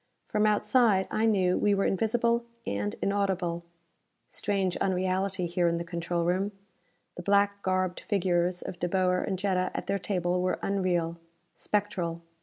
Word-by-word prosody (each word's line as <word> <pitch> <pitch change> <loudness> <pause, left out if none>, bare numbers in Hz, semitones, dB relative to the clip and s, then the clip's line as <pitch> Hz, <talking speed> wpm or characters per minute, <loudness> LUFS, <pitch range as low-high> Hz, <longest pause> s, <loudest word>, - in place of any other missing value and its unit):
From 210 0 +1
outside, 210 -1 +3
I 220 +1 +2
knew, 185 -4 +2
we 205 -1 +3
were 195 - +1
invisible 235 +4 +1 0.2
and 105 +1 -2
inaudible. 190 -4 0 0.7
Strange 195 -3 -1
unreality, 185 0 0
here 175 0 +1
in 170 0 +1
the 170 - -3
control 170 0 -2
room! 185 +4 0 0.6
The - - -4
black 200 +1 +2
garbed 185 -1 0
figures 180 -2 0
of 175 - -7
De 175 - -1
Boer 180 0 +2
and 190 - -2
Jetta 185 -1 0
at - - -3
their 200 - -1
table 180 -2 0
were 185 - 0
unreal, 175 -4 0 0.3
spectral. 180 -5 -2
185 Hz, 150 wpm, -28 LUFS, 175-200 Hz, 0.7 s, outside